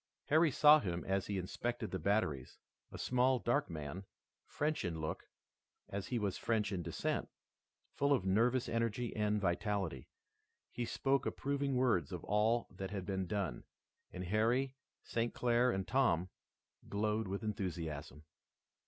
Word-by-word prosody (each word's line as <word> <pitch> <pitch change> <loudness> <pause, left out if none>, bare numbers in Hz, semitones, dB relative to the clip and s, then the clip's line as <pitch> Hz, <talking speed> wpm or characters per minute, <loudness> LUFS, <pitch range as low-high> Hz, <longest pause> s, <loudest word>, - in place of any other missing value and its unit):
Harry 160 +2 +5
saw 150 +2 +7
him 90 -6 -3
as 95 0 0
he 100 - -1
inspected 115 +5 -3
the 95 - -2
batteries, 80 - 0 0.3
a - - -7
small, 125 +1 +2
dark 120 +5 +1
man, 80 +3 -5 0.4
French 150 +1 -1
in 85 -3 -2
look, 80 0 -4 0.6
as 100 -1 -4
he 125 - -1
was 100 -4 -1
French 110 -3 0
in 95 -3 -1
descent, - - -2 0.6
full 140 +1 +1
of 130 -9 +3
nervous 115 +6 +3
energy 115 +1 -1
and 105 0 +1
vitality. 95 - -1 0.6
He 120 - -3
spoke 135 +2 +1
approving 140 -1 -1
words 125 -8 +2
of 90 -2 -5
all 110 +3 +2
that 95 0 -5
had 95 -2 -4
been 95 -1 -2
done, 90 -10 -2 0.5
and 90 - -5
Harry, 115 +8 +1 0.3
St. 115 0 -2
Clair 120 +1 +3
and 95 -5 -1
Tom, 95 -10 +2 0.6
glowed 105 +1 0
with 100 +3 -3
enthusiasm. 80 - -4
105 Hz, 145 wpm, -36 LUFS, 95-120 Hz, 0.6 s, saw